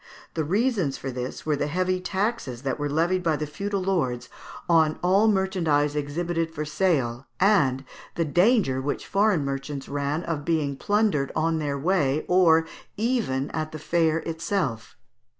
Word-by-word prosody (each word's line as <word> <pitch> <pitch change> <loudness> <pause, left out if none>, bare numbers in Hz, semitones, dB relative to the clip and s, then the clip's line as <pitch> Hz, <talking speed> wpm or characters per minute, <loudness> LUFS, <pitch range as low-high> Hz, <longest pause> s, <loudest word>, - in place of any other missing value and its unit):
The 160 - -1
reasons 195 - 0
for 135 - -5
this 125 0 -5
were, 155 -1 +1
the 145 - -1
heavy 185 +3 0
taxes 190 - -2
which 135 +1 -2
were 145 0 -1
levied 170 +5 +1
by 165 -3 +1
the 150 - -3
feudal 200 +5 -3
lords 150 -11 -1 0.4
on 160 -3 +3
all 195 +5 +4
merchandise 170 -8 +1
exhibited 165 +3 -2
for 155 -1 -5
sale, 145 -7 0
and 140 -10 +3 0.3
the 165 - 0
danger 175 - +3
which 145 +2 -3
foreign 195 -7 +2
merchants 135 0 -4
ran 145 +3 -2
of 160 -3 -3
being 150 -3 0
plundered 205 -6 +1
on 160 0 +1
their 145 -2 -2
way, 150 -2 +1
or 165 -3 +5 0.3
even 215 - 0
at 155 -1 -3
the - - -4
fair 160 0 +1
itself. 160 - -3
160 Hz, 155 wpm, -25 LUFS, 145-185 Hz, 0.4 s, or